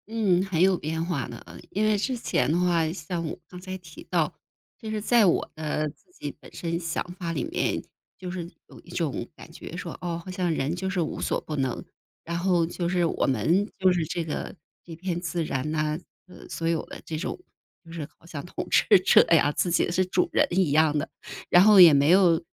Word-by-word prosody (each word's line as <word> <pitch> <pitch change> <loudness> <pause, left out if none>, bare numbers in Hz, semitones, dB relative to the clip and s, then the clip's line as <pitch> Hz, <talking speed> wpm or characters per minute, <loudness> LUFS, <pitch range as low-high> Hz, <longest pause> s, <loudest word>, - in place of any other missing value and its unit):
嗯， 205 -5 +2
很 180 -4 -1
有 185 0 +5
变 160 +1 -3
化 175 -1 -2
的， - - -8
呃， - - -12
因 210 +2 0
为 215 -1 +3
之 250 +5 -1
前 225 - 0
的 170 - +2
话， 170 -3 +2
像 170 0 -4
我 155 - -5
刚 180 0 -11
才 185 0 -6
提 170 -4 -13
到， - - +1 0.5
就 220 - -6
是 215 0 -2
在 225 +1 +4
我 175 - +2
的 155 0 -2
自 160 - -20
己 - - -7
本 - - -15
身 170 -1 -3
想 165 -2 -2 0.2
法 170 -2 -3
里 145 -6 -2
面， - - -1 0.3
就 180 0 -6
是 175 -2 -6 0.2
有 - - -14
一 - - -18
种 160 -9 -2
感 - - -13
觉 170 +1 -9
说， 175 -2 -6
哦， 170 -1 -3
好 185 - -6
像 180 -2 -1
人 155 +1 -1
就 190 +2 -3
是 190 -1 -2
无 155 - -3
所 - - 0
不 155 - -5
能， 130 -3 -2 0.4
然 170 +1 -3
后 175 -2 +2
就 175 +1 -3
是 175 -1 +2
我 165 - 0
们 175 +10 +2
就 185 -1 +4
是 175 -2 0
这 170 +2 -3
个 160 +3 -5 0.3
这 165 - -9
片 175 +1 -3
自 170 -1 -2
然 135 0 -2
呐， 155 0 -1 0.3
这 180 - -16
个 - - -13
所 165 - -3
有 165 -1 0
的 - - -9
这 160 - -5
种 165 - -4 0.5
就 165 - -13
是 160 -4 -5
好 - - -23
像 155 -4 -7
统 175 - -6
治 200 - +6
者 185 - +7
呀， 150 -3 +5
自 175 - 0
己 170 - +2
是 185 +2 +2
主 180 0 +1
人 - - +4
一 180 -4 +2
样 155 0 +4
的。 150 - -2 0.4
然 175 - +7
后 210 -1 +7
也 170 -4 +10
没 140 +1 +4
有， 175 -2 +5
170 Hz, 245 characters per minute, -26 LUFS, 160-185 Hz, 0.5 s, 也